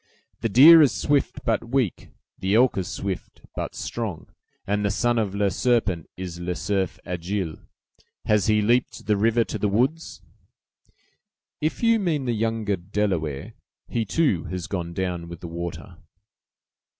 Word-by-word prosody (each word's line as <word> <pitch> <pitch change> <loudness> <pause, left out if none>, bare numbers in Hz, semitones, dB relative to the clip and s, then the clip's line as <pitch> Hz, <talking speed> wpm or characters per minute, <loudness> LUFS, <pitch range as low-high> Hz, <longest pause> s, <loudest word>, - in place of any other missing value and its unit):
"The 115 - -1
deer 155 +9 +9
is 145 - +5
swift, 145 -1 0
but 115 -1 +1
weak; 130 -7 -1 0.3
the 95 +2 +1
elk 125 +2 +4
is 95 -3 -2
swift, 95 -3 -5
but - - -4
strong; 110 -8 -5 0.3
and 105 +1 0
the 100 - +1
son 120 +3 +1
of 100 -3 -2
'Le 100 -1 +1
Serpent' 110 -7 0
is 90 -2 -6
'Le 90 0 -3
Cerf 95 -1 -1
Agile.' 90 -1 -3 0.7
Has 105 -3 +2
he 105 -1 +3
leaped 120 +4 +1
the 105 0 +2
river 115 +3 +3
to 110 - -5
the 105 - +1
woods?" 130 +11 -1 1.4
"If 155 +9 -2
you 230 -1 +4
mean 160 -8 -1
the 120 - 0
younger 110 -2 -1
Delaware, 90 -1 -2 0.3
he, 115 - -1
too, 110 - +1
has 90 -1 -4
gone 90 -4 -4
down 90 -3 -3
with 85 -1 -9
the 85 - -6
water." 85 0 -6
105 Hz, 155 wpm, -24 LUFS, 90-120 Hz, 1.4 s, deer